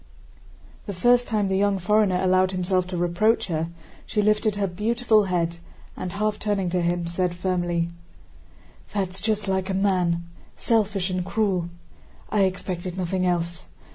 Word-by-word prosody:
The 200 Hz, -, -4 dB
first 245 Hz, +6 st, +4 dB
time 210 Hz, -3 st, +1 dB
the 190 Hz, -, 0 dB
young 200 Hz, -1 st, +2 dB
foreigner 195 Hz, 0 st, +2 dB
allowed 185 Hz, 0 st, +3 dB
himself 185 Hz, 0 st, 0 dB
to 185 Hz, -1 st, -4 dB
reproach 175 Hz, +7 st, +2 dB
her, 165 Hz, 0 st, -1 dB, 0.4 s
she 210 Hz, -, 0 dB
lifted 210 Hz, 0 st, +2 dB
her 205 Hz, -1 st, 0 dB
beautiful 215 Hz, +3 st, +2 dB
head 170 Hz, -2 st, -1 dB, 0.4 s
and, 180 Hz, 0 st, -5 dB
half 210 Hz, +1 st, -1 dB
turning 200 Hz, -4 st, -1 dB
to 180 Hz, 0 st, +1 dB
him, 175 Hz, 0 st, 0 dB
said 175 Hz, +1 st, -1 dB
firmly: 175 Hz, -2 st, -1 dB, 1.1 s
"That's 190 Hz, -1 st, -2 dB
just 215 Hz, -2 st, -1 dB
like 190 Hz, 0 st, 0 dB
a 190 Hz, -, 0 dB
man—selfish 190 Hz, +2 st, 0 dB
and 180 Hz, 0 st, -1 dB
cruel! 190 Hz, -3 st, 0 dB, 0.6 s
I 205 Hz, -2 st, +4 dB
expected 185 Hz, -1 st, -3 dB
nothing 185 Hz, 0 st, 0 dB
else. 170 Hz, -1 st, -1 dB
185 Hz, 145 wpm, -24 LUFS, 175-205 Hz, 1.1 s, first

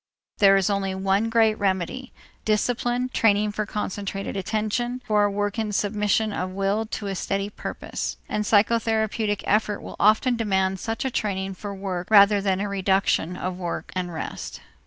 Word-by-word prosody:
There 195 Hz, -1 st, +7 dB
is 195 Hz, -, +1 dB
only 195 Hz, -2 st, -1 dB
one 195 Hz, +3 st, +1 dB
great 225 Hz, -1 st, +3 dB
remedy: 195 Hz, +6 st, -1 dB, 0.3 s
discipline, 245 Hz, +3 st, 0 dB
training 210 Hz, -3 st, +2 dB
for 210 Hz, 0 st, -3 dB
concentrated 200 Hz, -1 st, -4 dB
attention, 220 Hz, +5 st, -2 dB
for 210 Hz, -1 st, +3 dB
a -, -, +2 dB
work 205 Hz, +2 st, -2 dB
in 215 Hz, -1 st, -1 dB
submission 210 Hz, +1 st, +1 dB
of 185 Hz, -1 st, -2 dB
will 195 Hz, +3 st, -1 dB
to 215 Hz, -, -5 dB
a 195 Hz, -, -2 dB
steady 195 Hz, +2 st, -2 dB
purpose. -, -, -5 dB
And 210 Hz, -, -1 dB
psychotherapeutic 220 Hz, -1 st, +1 dB
effort 210 Hz, 0 st, +1 dB
will -, -, -9 dB
often 220 Hz, +5 st, +4 dB
demand 190 Hz, -3 st, 0 dB
such 225 Hz, +5 st, -3 dB
a 265 Hz, -, 0 dB
training 195 Hz, -3 st, -2 dB
for 200 Hz, +1 st, -7 dB
work 185 Hz, -2 st, -4 dB
rather 200 Hz, -1 st, +6 dB
than 190 Hz, -1 st, 0 dB
a 205 Hz, -, -1 dB
reduction 190 Hz, -3 st, +1 dB
of 185 Hz, 0 st, -4 dB
work 175 Hz, -2 st, -4 dB
and 180 Hz, -1 st, -2 dB
rest. 160 Hz, -, -6 dB
205 Hz, 165 wpm, -24 LUFS, 195-220 Hz, 0.3 s, There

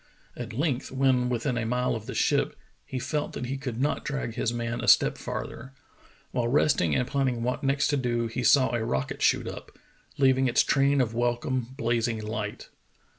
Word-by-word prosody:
At -, -, -6 dB
length, 135 Hz, 0 st, -1 dB
when 130 Hz, -2 st, +2 dB
within 120 Hz, +1 st, -1 dB
a 115 Hz, -, -2 dB
mile 125 Hz, +1 st, 0 dB
of 110 Hz, -1 st, -5 dB
the -, -, -5 dB
ship, -, -, +1 dB, 0.3 s
he 130 Hz, -, -4 dB
felt 150 Hz, +4 st, -2 dB
that -, -, -4 dB
he 130 Hz, +2 st, -3 dB
could 130 Hz, -4 st, -5 dB
not 145 Hz, +3 st, 0 dB
drag 135 Hz, -5 st, -3 dB
his 115 Hz, -, -1 dB
man 120 Hz, 0 st, -3 dB
a -, -, -4 dB
step -, -, +5 dB
farther. 130 Hz, +3 st, -6 dB, 0.6 s
While 120 Hz, -2 st, 0 dB
resting 120 Hz, -, +2 dB
and 125 Hz, -, +1 dB
planning 130 Hz, -5 st, 0 dB
what 125 Hz, +4 st, -2 dB
next 140 Hz, +1 st, +2 dB
to 145 Hz, -, +2 dB
do, 120 Hz, -2 st, 0 dB
he 115 Hz, +2 st, -3 dB
saw 130 Hz, -2 st, +4 dB
a 120 Hz, -2 st, 0 dB
rocket 65 Hz, -11 st, -2 dB
shoot -, -, +2 dB
up, -, -, -9 dB, 0.4 s
leaving 130 Hz, -1 st, +4 dB
its 120 Hz, -, +4 dB
train 140 Hz, 0 st, +3 dB
of 115 Hz, -3 st, -1 dB
welcome 120 Hz, +1 st, -1 dB
blazing 115 Hz, -1 st, 0 dB
hght. 105 Hz, -1 st, -5 dB
125 Hz, 190 wpm, -27 LUFS, 115-135 Hz, 0.6 s, step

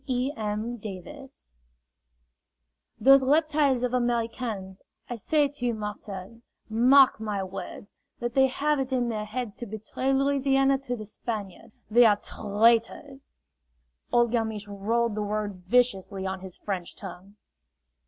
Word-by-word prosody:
E. 255 Hz, +1 st, 0 dB
M. 215 Hz, +2 st, -3 dB
Davis 220 Hz, -, -10 dB, 1.5 s
"Those 270 Hz, 0 st, +7 dB
reptiles 290 Hz, -2 st, +2 dB
of 250 Hz, 0 st, -1 dB
Americans, 230 Hz, -5 st, -2 dB, 0.3 s
I 240 Hz, -, -4 dB
say 290 Hz, +6 st, +2 dB
to 275 Hz, -3 st, -6 dB
you, 235 Hz, -, 0 dB
Marcel, 210 Hz, 0 st, -7 dB, 0.3 s
mark 250 Hz, +4 st, +5 dB
my 210 Hz, -3 st, -2 dB
words! 195 Hz, +2 st, -8 dB, 0.3 s
that 240 Hz, -1 st, -3 dB
they 265 Hz, 0 st, +5 dB
have 290 Hz, +2 st, 0 dB
it 265 Hz, 0 st, -2 dB
in 245 Hz, -2 st, +1 dB
their 215 Hz, -2 st, -3 dB
heads 220 Hz, 0 st, -5 dB
to 240 Hz, -, -7 dB
betray 220 Hz, +5 st, -3 dB
Louisiana 270 Hz, 0 st, +2 dB
to 245 Hz, -2 st, -4 dB
the 215 Hz, -2 st, -8 dB
Spaniard. 210 Hz, -2 st, -6 dB, 0.2 s
They 240 Hz, +2 st, +7 dB
are 210 Hz, -, +5 dB
tr -, -, -9 dB
r 215 Hz, -, -6 dB
raitors!" 230 Hz, +6 st, +2 dB, 0.8 s
Old 240 Hz, -1 st, +3 dB
Galmiche 220 Hz, -3 st, -1 dB
rolled 220 Hz, +3 st, 0 dB
the 210 Hz, -, -3 dB
word 205 Hz, -3 st, -3 dB
viciously 200 Hz, -4 st, +1 dB
on 190 Hz, 0 st, -3 dB
his 185 Hz, -1 st, -9 dB
French 185 Hz, -4 st, -5 dB
tongue. 195 Hz, +1 st, -10 dB
230 Hz, 145 wpm, -27 LUFS, 205-260 Hz, 1.5 s, Those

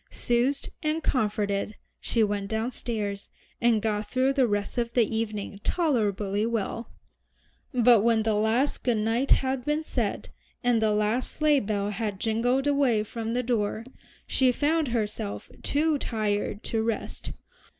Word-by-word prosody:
Soothed 250 Hz, +4 st, 0 dB
and 310 Hz, +1 st, -1 dB
comforted 210 Hz, -3 st, 0 dB, 0.2 s
she 230 Hz, -, +1 dB
went 205 Hz, -1 st, -1 dB
downstairs, 220 Hz, -3 st, -3 dB, 0.3 s
and 235 Hz, -3 st, +3 dB
got 210 Hz, -1 st, -1 dB
through 260 Hz, +1 st, +2 dB
the 265 Hz, -3 st, +3 dB
rest 205 Hz, +3 st, -1 dB
of 235 Hz, 0 st, -2 dB
the 240 Hz, -, +4 dB
evening 210 Hz, -2 st, -3 dB
tolerably 210 Hz, -, 0 dB
well. 230 Hz, 0 st, -2 dB, 0.8 s
But 240 Hz, -4 st, +5 dB
when 225 Hz, 0 st, +3 dB
the 220 Hz, 0 st, +1 dB
last 220 Hz, +7 st, +1 dB
good 240 Hz, -3 st, +2 dB
night 225 Hz, +5 st, 0 dB
had 260 Hz, -1 st, +2 dB
been 300 Hz, +3 st, 0 dB
said, -, -, -2 dB, 0.3 s
and 245 Hz, -2 st, +3 dB
the 220 Hz, -1 st, +3 dB
last 210 Hz, +4 st, +1 dB
sleigh 305 Hz, -2 st, +3 dB
bell 205 Hz, -2 st, -1 dB
had 210 Hz, -2 st, -3 dB
jingled 245 Hz, +5 st, +1 dB
away 275 Hz, -7 st, +2 dB
from 225 Hz, +1 st, -4 dB
the 250 Hz, -, 0 dB
door, 225 Hz, -2 st, -1 dB, 0.4 s
she 260 Hz, -1 st, +3 dB
found 305 Hz, +4 st, +1 dB
herself 215 Hz, -3 st, -3 dB
too 300 Hz, 0 st, +1 dB
tired 210 Hz, -3 st, -2 dB
to 225 Hz, -, -1 dB
rest. 225 Hz, -1 st, -3 dB
225 Hz, 145 wpm, -27 LUFS, 210-255 Hz, 0.8 s, But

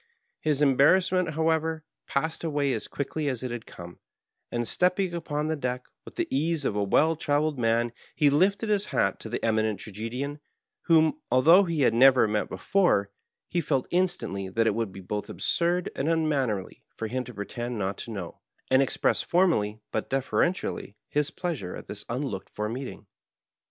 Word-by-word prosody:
His 150 Hz, -2 st, +1 dB
embarrassment, 165 Hz, +5 st, +4 dB
however, 160 Hz, 0 st, 0 dB, 0.2 s
passed 160 Hz, +4 st, -2 dB
away 145 Hz, -4 st, 0 dB
as 110 Hz, -, -3 dB
quickly 145 Hz, +2 st, -3 dB
as 130 Hz, -3 st, -2 dB
it 125 Hz, -, -3 dB
had 120 Hz, -2 st, -6 dB
come, 85 Hz, 0 st, -11 dB, 0.5 s
and, 120 Hz, -1 st, -1 dB
stepping 180 Hz, 0 st, +1 dB
upon 150 Hz, -3 st, -2 dB
the 160 Hz, -, 0 dB
deck, 125 Hz, -3 st, -3 dB, 0.2 s
with -, -, -12 dB
the -, -, -1 dB
ease 155 Hz, +1 st, 0 dB
of 105 Hz, -, 0 dB
a 105 Hz, -, +1 dB
well 155 Hz, +11 st, +3 dB
trayeled 150 Hz, -1 st, 0 dB
man, 115 Hz, 0 st, +1 dB, 0.2 s
he 145 Hz, -3 st, +4 dB
lifted 195 Hz, +9 st, +2 dB
his 210 Hz, -1 st, +2 dB
hat -, -, 0 dB
to 110 Hz, -, -7 dB
the 120 Hz, -, -2 dB
Eminent 110 Hz, -2 st, +1 dB
Tragedian, 120 Hz, +9 st, -5 dB, 0.5 s
whom, 165 Hz, -, +4 dB
although 165 Hz, +10 st, +6 dB
he 165 Hz, -4 st, -1 dB
had 130 Hz, -, +4 dB
never 130 Hz, 0 st, +6 dB
met 105 Hz, 0 st, -1 dB
before, 175 Hz, -, +1 dB, 0.4 s
he 175 Hz, -, 0 dB
felt 135 Hz, -4 st, 0 dB
instantly 175 Hz, -, -1 dB
that 115 Hz, +4 st, +1 dB
it 110 Hz, -, +3 dB
would 115 Hz, -2 st, -2 dB
be 95 Hz, +1 st, -9 dB
both 105 Hz, +3 st, -4 dB
absurd 175 Hz, +1 st, 0 dB
and 140 Hz, +4 st, -1 dB
unmannerly 140 Hz, -, 0 dB
for 115 Hz, -, -4 dB
him 125 Hz, +3 st, -2 dB
to 125 Hz, -, -9 dB
pretend 120 Hz, +4 st, -4 dB
not 95 Hz, -1 st, -2 dB
to -, -, -6 dB
know, 95 Hz, -6 st, -7 dB, 0.3 s
and 130 Hz, +1 st, +6 dB
expressed 135 Hz, -, +1 dB
formally 110 Hz, -, +2 dB
but 110 Hz, -, -2 dB
deferentially 135 Hz, -, -1 dB
his 150 Hz, 0 st, +1 dB
pleasure 155 Hz, -, -4 dB
at -, -, -10 dB
this -, -, -5 dB
unlooked -, -, -3 dB
for 105 Hz, 0 st, -3 dB
meeting. 125 Hz, +4 st, -6 dB
135 Hz, 175 wpm, -27 LUFS, 115-160 Hz, 0.5 s, although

